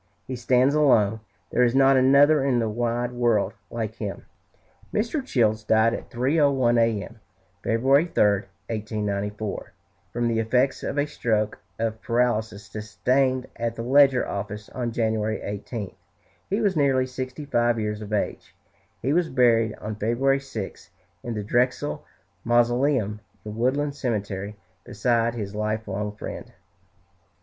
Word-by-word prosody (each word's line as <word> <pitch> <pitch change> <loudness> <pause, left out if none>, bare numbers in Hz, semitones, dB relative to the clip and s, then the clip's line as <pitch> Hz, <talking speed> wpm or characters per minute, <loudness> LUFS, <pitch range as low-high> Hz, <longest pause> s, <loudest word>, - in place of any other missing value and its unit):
He 130 - -5
stands 125 +3 +3
alone; 115 -8 +3 0.3
there 125 - +2
is 120 0 +3
not 135 0 +5
another 140 +3 +5
in 135 -3 +2
the 115 -2 +1
wide 120 +2 -1
world 120 -4 +1 0.2
like 110 -2 -4
him." 100 -3 -5 0.7
Mr. 235 +7 -1
Childs 110 - +1
died 110 +1 +3
at - - -6
3.01 130 -2 +2
A.M. 115 0 0 0.4
February 135 +7 +3
3, 170 - +2 0.5
1894 105 -1 -3 0.4
from 120 0 -1
the 115 -1 +1
effects 125 +4 +1
of - - -4
a 145 - +2
stroke 110 -7 -1 0.2
of 110 -1 -2
paralysis 110 -4 0
sustained 125 +5 0
at 115 0 -3
the 115 - -5
Ledger 135 0 +4
office 105 +1 -5
on 120 -2 -3
January 110 -1 0
18. 105 0 -5 0.6
He 200 +3 0
was 200 -4 +1
nearly 135 -3 +3
sixty 130 +3 -6
five 120 -4 +1
years 105 0 -3
of 105 0 -8
age. 105 - -3 0.5
He 135 +4 +1
was 175 0 +2
buried 115 -4 +3
on 110 - -6
February 130 +6 +1
6, 135 -8 -7 0.3
in 120 -1 -5
the 105 - -3
Drexel 125 +6 0 0.4
Mausoleum 120 -2 +2 0.3
in 105 0 -6
Woodland 140 +5 0
Cemetery 105 -6 -3 0.3
beside 115 0 0
his 105 -3 -5
life 110 +1 -2
long 105 +1 -3
friend. - - -8
120 Hz, 140 wpm, -25 LUFS, 110-130 Hz, 0.7 s, not